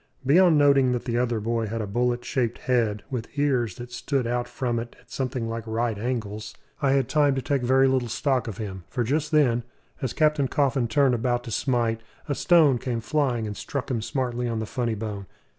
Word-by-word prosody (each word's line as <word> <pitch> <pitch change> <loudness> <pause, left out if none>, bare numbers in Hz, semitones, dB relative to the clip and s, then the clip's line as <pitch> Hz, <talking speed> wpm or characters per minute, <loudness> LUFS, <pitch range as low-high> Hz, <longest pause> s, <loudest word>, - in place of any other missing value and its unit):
Beyond 165 +3 +5
noting 140 -3 +4
that 120 - -3
the 120 -1 0
other 120 -2 0
boy 115 +1 -1
had 115 +2 -3
a 110 - -2
bullet 120 +4 -1
shaped 120 -4 -1
head 115 -5 0
with 120 -3 -4
ears 130 -6 +1
that 120 -1 -9
stood 135 0 -1
out 120 +1 -1
from 120 -2 -2
it 115 +1 -7
at - - -24
something 130 -3 -2
like 115 0 -4
right 115 0 0
angles, 105 -2 -4 0.3
I 135 -2 +3
had 135 -3 +2
time 145 -3 +3
to 135 - -1
take 140 -2 0
very 130 +2 +4
little 130 -2 +1
stock 130 +1 0
of 105 -3 -5
him; 95 -4 -6
for 120 - -1
just 150 +6 0
then, 130 -6 +3 0.4
us 130 - -2
Captain 150 -3 +2
Coffin 135 -3 +1
turned 130 +3 +3
about 120 +1 0
to 115 - -7
smite, 115 -1 0 0.3
a 145 - 0
stone 150 -5 +4
came 120 -2 -2
flying 125 -2 0
and 105 -1 -4
struck 135 +4 -4
him 115 -3 -1
smartly 125 -1 -2
on 115 -1 -2
the 110 - -2
funny 115 0 -2
bone. 105 -2 -5
120 Hz, 210 wpm, -25 LUFS, 115-135 Hz, 0.4 s, Beyond